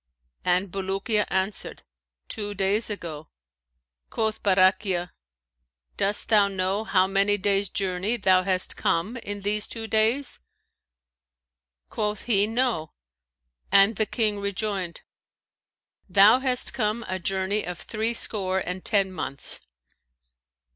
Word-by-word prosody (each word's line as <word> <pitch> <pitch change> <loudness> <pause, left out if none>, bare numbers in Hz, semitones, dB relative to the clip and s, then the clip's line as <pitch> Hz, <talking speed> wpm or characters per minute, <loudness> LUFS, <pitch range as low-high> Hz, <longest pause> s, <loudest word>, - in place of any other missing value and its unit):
And 180 +1 +1
Bulukiya 195 +3 -1
answered, 190 +2 -2 0.4
'Two 205 -1 -4
days 200 +4 +1
ago.' 160 -7 -6 0.8
Quoth 220 -1 -2
Barakhiya, 185 -2 +2 0.8
'Dost 205 +1 0
thou 210 -3 +5
know, 195 +2 -1
how 185 -4 +3
many 200 +2 +2
days' 200 0 +1
journey 195 +4 -1
thou 190 -3 +4
hast 185 -1 +1
come 185 +9 0
in 205 -3 -6
these 210 +1 -1
two 225 -1 -6
days?' 225 +5 +1 1.5
Quoth 210 -1 -2
he, 205 -3 +2
'No,' 225 -9 -1 0.8
and 200 +2 +5
the 220 - +1
King 215 -3 -1
rejoined, 200 -3 -3 1.1
'Thou 200 +6 +6
hast 255 -2 +1
come 220 -1 -1
a 185 0 -3
journey 195 +3 0
of 180 0 -5
threescore 215 -4 0
and 185 0 -4
ten 195 -3 +1
months.'" 140 -6 -5
200 Hz, 115 wpm, -25 LUFS, 190-215 Hz, 1.5 s, Thou